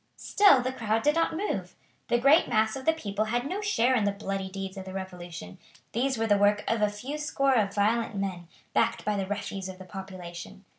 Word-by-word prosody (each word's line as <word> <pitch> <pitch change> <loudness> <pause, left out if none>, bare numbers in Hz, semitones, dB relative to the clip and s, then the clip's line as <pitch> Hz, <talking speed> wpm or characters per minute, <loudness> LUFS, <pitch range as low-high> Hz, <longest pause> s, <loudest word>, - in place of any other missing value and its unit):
Still 390 -12 +5
the 255 - -1
crowd 225 -2 -1
did 295 - +4
not 330 0 +1
move. 410 +4 -3 0.3
The 240 - +3
great 275 +7 +5
mass 220 -2 +2
of 265 -1 -7
the 320 - +5
people 215 -8 -2
had 240 +3 -1
no 375 +8 -3
share 260 - +2
in 220 - +2
the 205 - +2
bloody 195 -1 -4
deeds 195 0 -6
of 190 -1 -7
the 190 - -8
Revolution; 175 - -7 0.3
these 260 +2 0
were 225 - 0
the 205 -2 +3
work 205 +1 +3
of 225 -1 +1
a 210 - +3
few 255 +9 -6
score 275 -2 +1
of 205 -5 +1
violent 225 +2 +1
men, 190 -3 -3 0.3
backed - - +1
by 210 - +1
the 195 -1 -2
refuse 200 -1 -4
of 185 - -8
the 185 - -11
population. 185 -1 -9
210 Hz, 220 wpm, -28 LUFS, 195-255 Hz, 0.3 s, Still